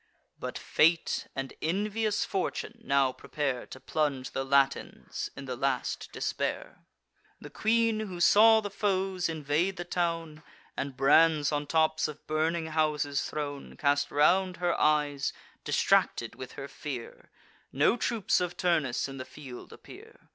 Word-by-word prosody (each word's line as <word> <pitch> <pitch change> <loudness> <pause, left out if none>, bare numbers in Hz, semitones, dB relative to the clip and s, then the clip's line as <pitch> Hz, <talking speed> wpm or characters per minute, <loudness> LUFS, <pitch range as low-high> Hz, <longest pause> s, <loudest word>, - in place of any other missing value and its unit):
But - - -5
fate 165 +1 +2
and 135 -1 -4
envious 210 +5 0
fortune 210 +4 -3
now 140 - +3
prepare 135 -1 -3
To 130 - -10
plunge 140 -3 -1
the 135 - -2
Latins 135 0 0
in 140 - -8
the 130 -1 -4
last 130 0 -2
despair. - - -4 0.5
The - - -11
queen, 225 0 +2
who 190 -5 -5
saw 220 +5 +6
the 205 -1 -5
foes 190 -3 0
invade 160 +4 0
the 175 - -5
town, 165 -3 -2 0.3
And 135 -2 -4
brands 150 +2 +4
on 145 -1 -2
tops 155 0 +2
of 150 -1 -10
burning 160 +2 0
houses 155 -2 0
thrown, 145 -2 -5
Cast 145 0 +1
round 180 +5 +3
her 175 -1 +1
eyes, 150 -2 +2 0.3
distracted - - +2
with - - -9
her - - -7
fear— - - -8 0.4
No - - +3
troops 230 -6 +1
of 180 0 -3
Turnus 155 -10 +1
in 135 0 -8
the 130 - -5
field 130 -2 -11
appear. - - -14
155 Hz, 140 wpm, -29 LUFS, 140-185 Hz, 0.5 s, saw